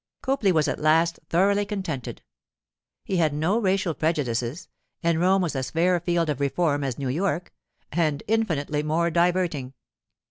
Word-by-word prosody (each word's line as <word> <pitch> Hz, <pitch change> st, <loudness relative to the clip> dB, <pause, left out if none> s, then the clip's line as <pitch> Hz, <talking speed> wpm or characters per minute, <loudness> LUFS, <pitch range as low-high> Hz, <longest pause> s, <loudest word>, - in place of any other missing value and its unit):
Copley 265 Hz, -8 st, +2 dB
was 155 Hz, -4 st, +2 dB
at -, -, -2 dB
last 165 Hz, +2 st, +3 dB
thoroughly 200 Hz, +4 st, +3 dB
contented; 190 Hz, -, -5 dB, 0.8 s
he 190 Hz, -, -2 dB
had 155 Hz, -4 st, +2 dB
no 175 Hz, +9 st, +1 dB
racial 190 Hz, -4 st, +1 dB
prejudices, 145 Hz, -1 st, -1 dB, 0.4 s
and 165 Hz, -1 st, +2 dB
Rome 190 Hz, +2 st, +3 dB
was 165 Hz, -4 st, -2 dB
as 130 Hz, -1 st, -2 dB
fair 175 Hz, +5 st, +2 dB
a -, -, 0 dB
field 170 Hz, -1 st, 0 dB
of 145 Hz, -3 st, -2 dB
reform 145 Hz, +1 st, 0 dB
as 130 Hz, -3 st, -3 dB
New 135 Hz, -2 st, -3 dB
York—and 150 Hz, -, -3 dB
infinitely 160 Hz, -10 st, 0 dB
more 165 Hz, +3 st, 0 dB
diverting. 170 Hz, -6 st, 0 dB
165 Hz, 150 wpm, -25 LUFS, 145-185 Hz, 0.8 s, last